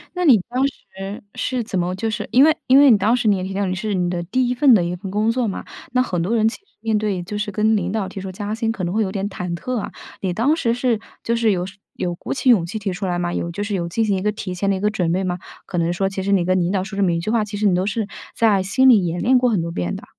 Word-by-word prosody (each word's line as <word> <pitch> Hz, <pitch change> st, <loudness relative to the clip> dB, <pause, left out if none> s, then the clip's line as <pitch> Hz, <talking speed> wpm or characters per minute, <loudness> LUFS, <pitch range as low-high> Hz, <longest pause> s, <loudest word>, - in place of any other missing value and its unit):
那 360 Hz, -, 0 dB
你 250 Hz, -, +7 dB
当 255 Hz, +3 st, 0 dB
时 195 Hz, -6 st, -8 dB
是 255 Hz, -2 st, -2 dB
怎 190 Hz, -4 st, -2 dB
么 180 Hz, +1 st, -1 dB
就 220 Hz, +3 st, -2 dB
是 210 Hz, 0 st, -3 dB
因 260 Hz, -, +6 dB
为 315 Hz, +1 st, +5 dB
因 260 Hz, -, +6 dB
为 285 Hz, -2 st, +8 dB
你 220 Hz, -, +6 dB
当 220 Hz, +5 st, +2 dB
时， 230 Hz, -, 0 dB
你 205 Hz, -, +5 dB
也 185 Hz, -, -3 dB
提 190 Hz, +1 st, -4 dB
到 200 Hz, 0 st, 0 dB
你 185 Hz, -, -1 dB
是 210 Hz, +2 st, -2 dB
你 180 Hz, -1 st, 0 dB
的 175 Hz, -1 st, -2 dB
第 250 Hz, +8 st, 0 dB
1 250 Hz, -, +1 dB
份 260 Hz, 0 st, +5 dB
的 185 Hz, -, +3 dB
一 175 Hz, +1 st, -2 dB
份 190 Hz, +2 st, -7 dB
工 215 Hz, +3 st, +1 dB
作 245 Hz, -1 st, 0 dB
嘛， 195 Hz, -, -5 dB, 0.3 s
那 255 Hz, 0 st, +3 dB
很 180 Hz, -8 st, -2 dB
多 195 Hz, +8 st, 0 dB
人 220 Hz, -1 st, +3 dB
其 225 Hz, -, -2 dB
实 -, -, -34 dB, 0.2 s
面 225 Hz, -1 st, +1 dB
对 205 Hz, -4 st, -1 dB
就 205 Hz, +3 st, -5 dB
是 210 Hz, 0 st, -2 dB
跟 215 Hz, +2 st, +2 dB
领 185 Hz, -3 st, -1 dB
导 210 Hz, -2 st, -1 dB
提 190 Hz, +1 st, -7 dB
出 190 Hz, 0 st, -6 dB
加 205 Hz, +3 st, -4 dB
薪， 225 Hz, 0 st, -1 dB
可 215 Hz, -4 st, -5 dB
能 175 Hz, +1 st, -2 dB
会 220 Hz, -, +1 dB
有 190 Hz, -, -3 dB
点 195 Hz, 0 st, -2 dB
忐 180 Hz, -3 st, -4 dB
忑 255 Hz, +9 st, -4 dB
啊。 215 Hz, -, -4 dB, 0.3 s
你 185 Hz, -2 st, -1 dB
当 250 Hz, -, +2 dB
时 235 Hz, -8 st, 0 dB
是 245 Hz, -3 st, +1 dB, 0.2 s
就 235 Hz, -, 0 dB
是 230 Hz, -1 st, +2 dB
有 180 Hz, -1 st, -1 dB
是 195 Hz, +1 st, -11 dB, 0.2 s
有 175 Hz, -, -2 dB
鼓 -, -, -7 dB
起 265 Hz, -, +1 dB
勇 220 Hz, -8 st, +6 dB
气 205 Hz, +6 st, -5 dB
提 200 Hz, -3 st, -3 dB
出 195 Hz, +2 st, -4 dB
来 175 Hz, -1 st, -1 dB
吗？ 175 Hz, 0 st, -2 dB
有 170 Hz, -, -2 dB
就 205 Hz, +4 st, -4 dB
是 205 Hz, 0 st, -3 dB
有 170 Hz, -3 st, -2 dB
进 225 Hz, +6 st, 0 dB
行 205 Hz, -2 st, +1 dB
一 -, -, -3 dB
个 210 Hz, +2 st, +1 dB
提 195 Hz, -3 st, -5 dB
前 195 Hz, +2 st, -1 dB
的 195 Hz, -, +2 dB
一 -, -, -3 dB
个 210 Hz, +2 st, +2 dB
准 180 Hz, -6 st, 0 dB
备 185 Hz, +2 st, 0 dB
吗？ 180 Hz, -1 st, -2 dB, 0.3 s
可 180 Hz, -, -5 dB
能 170 Hz, 0 st, +1 dB
说 195 Hz, +3 st, 0 dB
其 195 Hz, 0 st, -4 dB
实 200 Hz, +1 st, -1 dB
你 180 Hz, -3 st, +3 dB
跟 185 Hz, 0 st, +2 dB
领 175 Hz, +1 st, 0 dB
导 190 Hz, -2 st, 0 dB
说 195 Hz, +1 st, -7 dB
这 200 Hz, -, -1 dB
么 180 Hz, -, +3 dB
一 170 Hz, -, 0 dB
句 195 Hz, +6 st, -2 dB
话， 230 Hz, -2 st, +2 dB
其 205 Hz, 0 st, -6 dB
实 210 Hz, -, -1 dB
你 190 Hz, -, +4 dB
都 180 Hz, +1 st, +1 dB
是 210 Hz, 0 st, -1 dB, 0.3 s
在 215 Hz, -4 st, +3 dB
心 260 Hz, +8 st, +3 dB
里 220 Hz, -6 st, +6 dB
演 170 Hz, +1 st, -2 dB
练 255 Hz, +1 st, +4 dB
过 250 Hz, 0 st, +2 dB
很 205 Hz, -7 st, +1 dB
多 170 Hz, 0 st, -4 dB
遍 90 Hz, -, -2 dB
的。 -, -, -8 dB
200 Hz, 355 characters per minute, -21 LUFS, 185-225 Hz, 0.3 s, 为